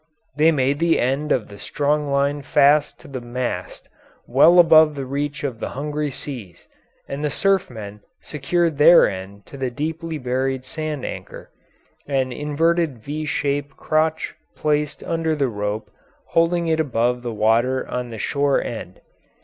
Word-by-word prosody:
They 155 Hz, +2 st, +5 dB
made 140 Hz, -1 st, +1 dB
the 165 Hz, 0 st, +2 dB
end 135 Hz, +5 st, 0 dB
of 120 Hz, -5 st, +1 dB
the 100 Hz, -1 st, -12 dB
strong 150 Hz, 0 st, -1 dB
line 140 Hz, +1 st, +1 dB
fast 145 Hz, +1 st, +3 dB
to -, -, -14 dB
the 130 Hz, -2 st, -6 dB
mast 120 Hz, +1 st, -5 dB, 0.4 s
well 140 Hz, +8 st, +5 dB
above 160 Hz, -3 st, +7 dB
the 135 Hz, -1 st, -4 dB
reach 145 Hz, +2 st, -3 dB
of 130 Hz, -6 st, -3 dB
the -, -, -4 dB
hungry 150 Hz, +1 st, -2 dB
seas, 125 Hz, -, -8 dB, 0.4 s
and 140 Hz, +2 st, -5 dB
the 150 Hz, -, +1 dB
surfmen 125 Hz, -, -1 dB, 0.2 s
secured 155 Hz, +1 st, -1 dB
their 165 Hz, +3 st, +8 dB
end 100 Hz, +1 st, -7 dB
to 140 Hz, -, -11 dB
the 130 Hz, -1 st, -2 dB
deeply 160 Hz, +5 st, -4 dB
buried 130 Hz, 0 st, -2 dB
sand 155 Hz, 0 st, -4 dB
anchor, -, -, -8 dB, 0.6 s
an 135 Hz, -2 st, 0 dB
inverted 150 Hz, +1 st, 0 dB
V 155 Hz, +3 st, -4 dB
shaped 145 Hz, -1 st, -2 dB
crotch 155 Hz, 0 st, 0 dB, 0.2 s
placed 150 Hz, -1 st, -1 dB
under 165 Hz, -1 st, -1 dB
the 140 Hz, -3 st, 0 dB
rope 105 Hz, 0 st, -4 dB, 0.4 s
holding 170 Hz, +1 st, +2 dB
it 160 Hz, -1 st, +1 dB
above 125 Hz, -4 st, 0 dB
the 120 Hz, -1 st, -4 dB
water 115 Hz, +4 st, +1 dB
on 125 Hz, -1 st, -4 dB
the 115 Hz, -, -7 dB
shore 140 Hz, +6 st, +1 dB
end. 100 Hz, -6 st, -6 dB
140 Hz, 155 wpm, -22 LUFS, 125-155 Hz, 0.6 s, their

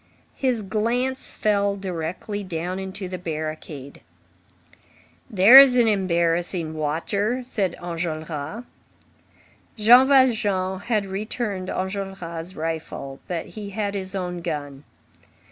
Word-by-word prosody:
His 250 Hz, -5 st, -1 dB
glance 240 Hz, +6 st, -1 dB
fell 200 Hz, -1 st, +1 dB
directly 190 Hz, +2 st, -4 dB
down 180 Hz, +1 st, -4 dB
into 190 Hz, 0 st, -5 dB
the 185 Hz, 0 st, -6 dB
barricade. 155 Hz, -4 st, -6 dB, 1.3 s
"There's 250 Hz, +7 st, +9 dB
an 240 Hz, -2 st, +4 dB
embarrassing 170 Hz, -4 st, 0 dB
watcher," 200 Hz, +11 st, -1 dB
said 200 Hz, -8 st, -1 dB
Enjolras. 160 Hz, +1 st, -4 dB, 1.1 s
Jean 240 Hz, +5 st, +7 dB
Valjean 205 Hz, -9 st, +3 dB
had 215 Hz, -1 st, -1 dB
returned 195 Hz, -1 st, -3 dB
Enjolras' 185 Hz, -3 st, -5 dB
rifle, 155 Hz, -4 st, -5 dB
but 170 Hz, -2 st, -3 dB
he 210 Hz, -2 st, -7 dB
had 200 Hz, 0 st, -2 dB
his 190 Hz, -1 st, -4 dB
own 180 Hz, -2 st, -3 dB
gun. 145 Hz, -4 st, -5 dB
190 Hz, 100 wpm, -23 LUFS, 165-210 Hz, 1.3 s, There's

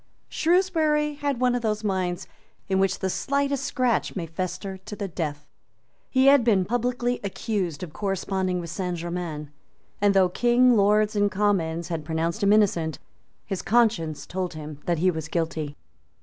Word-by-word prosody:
Shrewsbury 320 Hz, -4 st, +2 dB
had 285 Hz, -3 st, -2 dB
one 250 Hz, -1 st, +3 dB
of 245 Hz, -, -1 dB
those 215 Hz, -1 st, -1 dB
minds 185 Hz, -3 st, -1 dB, 0.4 s
in 190 Hz, -1 st, +1 dB
which 195 Hz, 0 st, +2 dB
the 190 Hz, -, -2 dB
slightest 280 Hz, +2 st, 0 dB
scratch 255 Hz, -4 st, 0 dB
may 180 Hz, -4 st, -3 dB
fester 185 Hz, +3 st, -4 dB
to 210 Hz, +3 st, -8 dB
the 200 Hz, -1 st, -4 dB
death. 150 Hz, -5 st, -4 dB, 0.6 s
He 260 Hz, 0 st, +3 dB
had 275 Hz, -2 st, +7 dB
been 200 Hz, -6 st, +3 dB
publicly 245 Hz, +2 st, -1 dB
accused 195 Hz, -5 st, -2 dB
of 160 Hz, -4 st, -7 dB
corresponding 190 Hz, -2 st, -1 dB
with 170 Hz, -2 st, -6 dB
Saint 180 Hz, 0 st, -3 dB
Germains; 170 Hz, -3 st, -4 dB, 0.5 s
and, 205 Hz, -1 st, +4 dB
though 190 Hz, -2 st, +5 dB
King, 245 Hz, +4 st, +4 dB
Lords 210 Hz, +1 st, +3 dB
and 205 Hz, 0 st, +3 dB
Commons 175 Hz, -5 st, 0 dB
had 165 Hz, -3 st, -3 dB
pronounced 165 Hz, +5 st, -2 dB
him 200 Hz, 0 st, +4 dB
innocent, 175 Hz, -8 st, +2 dB, 0.5 s
his 195 Hz, -2 st, -3 dB
conscience 205 Hz, -9 st, +1 dB
told 180 Hz, -2 st, -4 dB
him 150 Hz, -1 st, -8 dB
that 170 Hz, -1 st, +2 dB
he 180 Hz, +3 st, +3 dB
was 160 Hz, -2 st, -5 dB
guilty. 160 Hz, -3 st, -3 dB
195 Hz, 165 wpm, -25 LUFS, 170-240 Hz, 0.6 s, had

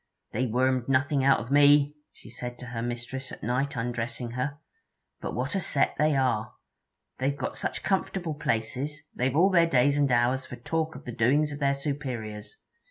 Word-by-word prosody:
'They 125 Hz, +4 st, 0 dB
wormed 130 Hz, +1 st, +1 dB
nothing 135 Hz, +1 st, +2 dB
out 140 Hz, +1 st, +5 dB
of 115 Hz, +3 st, -7 dB
me,' 145 Hz, 0 st, +6 dB, 0.2 s
she -, -, -17 dB
said 120 Hz, 0 st, -7 dB
to 125 Hz, -, -9 dB
her 120 Hz, -2 st, -5 dB
mistress 120 Hz, +2 st, -4 dB
at -, -, -10 dB
night, 130 Hz, +5 st, 0 dB
undressing 120 Hz, 0 st, -3 dB
her. 130 Hz, +4 st, -3 dB, 0.6 s
'But -, -, -5 dB
what 125 Hz, +4 st, -2 dB
a 195 Hz, -, 0 dB
set 140 Hz, -, +1 dB
they 150 Hz, -1 st, +3 dB
are! 125 Hz, -5 st, 0 dB, 0.6 s
They've 140 Hz, +2 st, 0 dB
got 130 Hz, -, -3 dB
such -, -, -2 dB
comfortable 190 Hz, -3 st, -1 dB
places, 135 Hz, +2 st, -2 dB
they've 130 Hz, +2 st, 0 dB
all 185 Hz, +5 st, +5 dB
their 170 Hz, -2 st, +5 dB
days 140 Hz, 0 st, +3 dB
and 140 Hz, -2 st, +3 dB
hours 125 Hz, +2 st, +2 dB
for -, -, -7 dB
talk 160 Hz, +6 st, -2 dB
of -, -, -10 dB
the 120 Hz, -, -4 dB
doings 140 Hz, +7 st, +2 dB
of 145 Hz, -, -6 dB
their 140 Hz, -1 st, +2 dB
superiors. 130 Hz, -7 st, -5 dB
130 Hz, 185 wpm, -27 LUFS, 120-145 Hz, 0.6 s, me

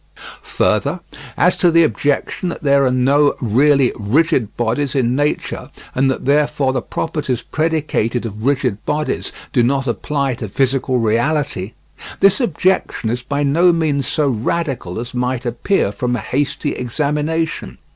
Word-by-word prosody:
Further, -, -, +1 dB, 0.4 s
as -, -, +4 dB
to 175 Hz, -, +4 dB
the 165 Hz, 0 st, +5 dB
objection 145 Hz, +4 st, -1 dB
that 170 Hz, -, -7 dB
there 140 Hz, -1 st, +4 dB
are -, -, +1 dB
no 140 Hz, +3 st, +3 dB
really 135 Hz, +3 st, +3 dB
rigid 130 Hz, -, +1 dB
bodies 120 Hz, +5 st, -1 dB
in 125 Hz, -2 st, +1 dB
nature, 145 Hz, +2 st, -2 dB, 0.2 s
and 135 Hz, +1 st, +2 dB
that 130 Hz, -, -3 dB
therefore 140 Hz, -1 st, +2 dB
the 130 Hz, -, -1 dB
properties 130 Hz, -3 st, -3 dB
predicated 150 Hz, -7 st, -1 dB
of 110 Hz, -1 st, -6 dB
rigid 130 Hz, -6 st, 0 dB
bodies 150 Hz, +1 st, -2 dB, 0.2 s
do 125 Hz, -, +4 dB
not 135 Hz, +3 st, +1 dB
apply 140 Hz, +2 st, -1 dB
to 115 Hz, -3 st, -6 dB
physical 130 Hz, +2 st, 0 dB
reality, 115 Hz, -2 st, 0 dB, 0.5 s
this 195 Hz, +4 st, +4 dB
objection 185 Hz, -, 0 dB
is 125 Hz, +1 st, -2 dB
by 140 Hz, +3 st, -2 dB
no 165 Hz, +6 st, +4 dB
means 155 Hz, -5 st, 0 dB
so 150 Hz, -2 st, +1 dB
radical 125 Hz, -, -2 dB
as 120 Hz, +1 st, -6 dB
might 125 Hz, 0 st, -2 dB
appear 120 Hz, -, 0 dB
from 125 Hz, +3 st, -2 dB
a -, -, -2 dB
hasty 140 Hz, +6 st, -2 dB
examination. 150 Hz, -, -2 dB
135 Hz, 145 wpm, -18 LUFS, 120-150 Hz, 0.5 s, the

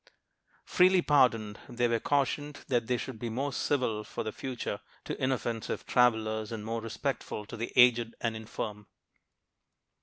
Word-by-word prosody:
Freely 185 Hz, 0 st, +4 dB
pardoned, 120 Hz, -7 st, +3 dB
they 120 Hz, 0 st, +1 dB
were 115 Hz, -1 st, +1 dB
cautioned 145 Hz, +3 st, -1 dB
that 120 Hz, -3 st, +1 dB
they 125 Hz, 0 st, +1 dB
should 125 Hz, -2 st, -6 dB
be 120 Hz, -, -3 dB
more 135 Hz, +5 st, -2 dB
civil 125 Hz, -8 st, 0 dB
for -, -, -5 dB
the 110 Hz, -, -3 dB
future 125 Hz, -6 st, -4 dB, 0.2 s
to -, -, -4 dB
inoffensive 120 Hz, -3 st, -1 dB
travelers, 110 Hz, -3 st, +2 dB
and 110 Hz, -2 st, -5 dB
more 115 Hz, +1 st, -2 dB
respectful 115 Hz, -1 st, -3 dB
to 110 Hz, -, -8 dB
the 115 Hz, +1 st, -4 dB
aged 120 Hz, -2 st, +5 dB
and 115 Hz, -1 st, -1 dB
infirm. 105 Hz, -1 st, -6 dB
115 Hz, 150 wpm, -30 LUFS, 110-130 Hz, 0.2 s, aged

